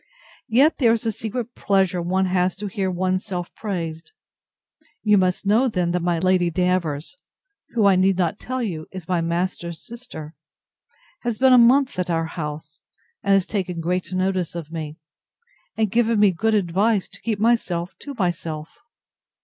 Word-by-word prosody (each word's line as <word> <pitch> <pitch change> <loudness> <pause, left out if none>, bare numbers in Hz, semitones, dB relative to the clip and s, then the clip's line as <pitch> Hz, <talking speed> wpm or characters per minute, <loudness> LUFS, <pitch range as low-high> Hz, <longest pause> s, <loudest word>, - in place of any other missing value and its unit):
Yet 270 +8 +4
there 235 -5 +5
is 230 0 -2
a 225 - +1
secret 225 +3 -5
pleasure 190 -3 +1
one 185 +2 +1
has 180 0 +1
to 200 +3 -7
hear 195 -1 -2
one's 185 +1 0
self 180 -4 -5
praised. 170 - -5 0.9
You 210 -1 +5
must 185 0 +1
know, 220 +6 +4
then, 180 -7 0
that 180 - +1
my 175 0 +1
Lady 180 0 +2
Davers, 180 - -1 0.6
who, 220 -3 +3
I 195 -1 +6
need 190 0 +3
not 180 +2 0
tell 255 0 -3
you, 165 -8 -4
is 185 -3 -8
my 180 -2 +1
master's 170 0 -3
sister, 230 -11 -9 0.9
has 240 -3 -2
been 260 0 +5
a - - +8
month 255 -1 +4
at 180 - -1
our 165 -1 +1
house, 155 -1 -6 0.4
and 200 -1 +3
has 195 -2 +2
taken 185 -4 -3
great 175 +1 -2
notice 185 -2 -1
of 165 -2 -6
me, 155 -2 -5 0.8
and 220 -3 +1
given 230 -1 +2
me 205 -2 +6
good 220 +5 +1
advice 200 +2 +1
to - - -14
keep 225 -3 -1
myself 200 -6 +1
to 285 -1 -8
myself. 165 -4 -3
185 Hz, 170 wpm, -23 LUFS, 170-215 Hz, 0.9 s, a